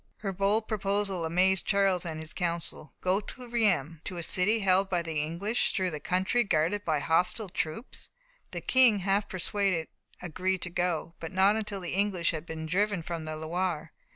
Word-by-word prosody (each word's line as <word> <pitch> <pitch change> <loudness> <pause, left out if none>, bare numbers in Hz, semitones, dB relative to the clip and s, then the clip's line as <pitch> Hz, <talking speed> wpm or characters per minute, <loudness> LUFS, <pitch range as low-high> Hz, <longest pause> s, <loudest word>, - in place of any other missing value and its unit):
Her 195 -2 -2
bold 200 +4 +1
proposal 195 -4 -1
amazed 185 +3 +2
Charles 195 -3 +2
and 160 -1 -4
his 160 0 -5
council. 170 -3 -3
Go 185 +2 +2
to 250 +4 -9
Reims, 185 - +1
to 180 - -5
a 170 - -3
city 205 +7 +2
held 190 0 +3
by 175 -2 0
the 160 -2 -1
English, 175 +10 0
through 185 -3 0
a 150 - -4
country 185 +9 +1
guarded 200 +1 +1
by 155 -2 +1
hostile 180 +7 +1
troops! 170 - -4 0.4
The - - -5
King, 245 -6 +5
half 200 +2 +1
persuaded, 185 -2 0 0.3
agreed 185 +2 -2
to 175 - -3
go, 170 -2 -1
but 165 - -6
not 190 +2 +4
until 210 -3 -3
the 175 - -4
English 190 -3 +1
had 160 0 -6
been 160 0 -5
driven 195 +1 0
from 165 -1 -4
the 155 0 -4
Loire. 165 0 -2
185 Hz, 180 wpm, -29 LUFS, 165-200 Hz, 0.4 s, King